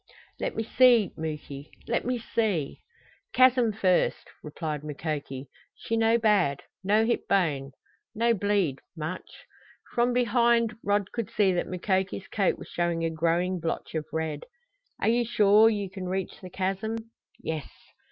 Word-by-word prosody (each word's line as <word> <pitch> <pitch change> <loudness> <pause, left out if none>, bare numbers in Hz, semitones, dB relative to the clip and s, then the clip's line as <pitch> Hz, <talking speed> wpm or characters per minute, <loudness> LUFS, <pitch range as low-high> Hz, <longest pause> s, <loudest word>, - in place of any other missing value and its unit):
"Let - - -2
me 225 - -1
see, 235 -3 +4
Muky 150 -2 -6 0.2
let 235 - 0
me 250 0 0
see 210 -10 -1 0.3
" - - -33
"Chasm 255 -3 +5
first," 190 -4 +1
replied 150 -1 -5
Mukoki. 145 -3 -5 0.3
"She 230 - -3
no 225 +1 +4
bad. 200 - +2 0.2
No 210 +3 +3
hit 235 - -1
bone. 145 -8 +1 0.4
No 235 +2 +3
bleed 200 - 0 0.2
much." 160 +4 -6 0.5
From 240 +1 +2
behind 235 -2 +2
Rod 205 -1 0
could 230 -4 -3
see 195 -3 +2
that 175 - -1
Mukoki's 190 +1 -1
coat 195 -3 +1
was - - -10
showing 170 -1 -1
a 165 - -1
growing 170 +3 0
blotch 165 0 -4
of 155 -2 -3
red. 160 -2 -3 0.5
"Are - - 0
you 240 +1 +3
sure 215 -1 +5
you 205 -3 -2
can 185 -1 -6
reach 190 0 -3
the 185 - -8
chasm?" 195 +5 -2 0.4
"Yes." 160 -3 -4
190 Hz, 150 wpm, -27 LUFS, 160-225 Hz, 0.5 s, Chasm